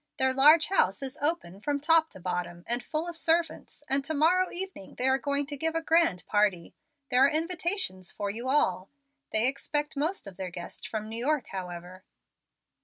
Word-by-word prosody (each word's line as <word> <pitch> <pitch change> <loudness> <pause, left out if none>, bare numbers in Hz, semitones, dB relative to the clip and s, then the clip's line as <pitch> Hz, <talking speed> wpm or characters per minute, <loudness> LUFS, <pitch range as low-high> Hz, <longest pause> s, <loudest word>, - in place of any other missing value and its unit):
Their 260 0 +2
large 300 +4 +6
house 275 - +2
is 265 -1 -5
open 290 - -1
from 285 +4 -1
top 320 +2 +3
to - - -9
bottom, 175 -1 -4
and 240 +1 +2
full 315 +2 -2
of 345 - -5
servants, 330 -2 0
and 275 +1 +1
to 310 +3 -2
morrow 360 +5 +3
evening 370 - -6
they 255 - +1
are 265 0 +3
going 285 0 -1
to 290 +1 -6
give 320 +3 -1
a 330 - 0
grand 320 - +2
party. 205 -5 0 0.4
There 250 +1 +5
are - - +4
invitations 330 - -1
for 200 -1 -3
you 235 +5 -4
all. 190 -10 +1 0.4
They 220 +1 +2
expect 295 +3 -1
most 315 - -1
of 195 -3 -9
their 190 -1 -4
guests 175 0 -7
from 215 -1 -5
New 225 +2 -4
York, 295 -2 0
however." 180 -1 -7
270 Hz, 190 wpm, -28 LUFS, 195-320 Hz, 0.4 s, large